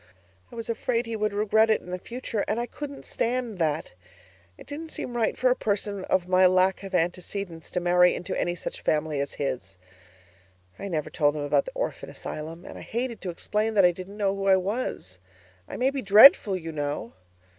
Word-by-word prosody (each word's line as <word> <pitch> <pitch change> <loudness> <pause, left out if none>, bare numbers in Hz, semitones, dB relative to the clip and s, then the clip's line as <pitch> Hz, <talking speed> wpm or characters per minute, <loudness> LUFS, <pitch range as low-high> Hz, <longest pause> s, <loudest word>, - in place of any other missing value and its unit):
I - - -11
was 230 -1 -5
afraid 230 +1 -1
he 230 -1 -4
would 215 -1 0
regret 215 +2 +3
it 220 - +3
in 180 - -11
the 180 - -3
future 230 -1 -4
and 225 - 0
I 240 - -1
couldn't 285 +2 -8
stand 235 -4 -2
that! 155 - -1 0.6
It - - -13
didn't 315 +3 -7
seem 245 -5 -6
right 230 -2 0
for 255 0 +3
a - - +3
person 200 -3 -2
of 180 -1 +1
my 185 0 +5
lack 185 +1 +3
of 195 -1 -5
antecedents 175 0 -2
to 180 - -1
marry 180 0 +4
into 175 - -4
any 175 0 -1
such - - -6
family 150 -1 0
as 140 0 -3
his. 130 -9 -4 1.0
I 200 - -5
never 155 -6 -3
told 145 -1 +2
him 150 - -3
about 145 - +2
the - - -6
orphan - - -3
asylum, 165 +3 -7
and - - -9
I - - -9
hated 235 0 -4
to 185 - -4
explain 215 +5 -1
that 195 -3 +6
I 175 - +6
didn't 185 +3 -9
know 200 -2 +1
who 195 0 -3
I 190 -1 +6
was. 185 - -3 0.5
I - - -6
may 260 +2 +2
be 275 -1 -3
DREADFUL, 205 -1 +8
you 165 -2 -6
know. 145 -5 -4
195 Hz, 210 wpm, -26 LUFS, 170-225 Hz, 1.0 s, DREADFUL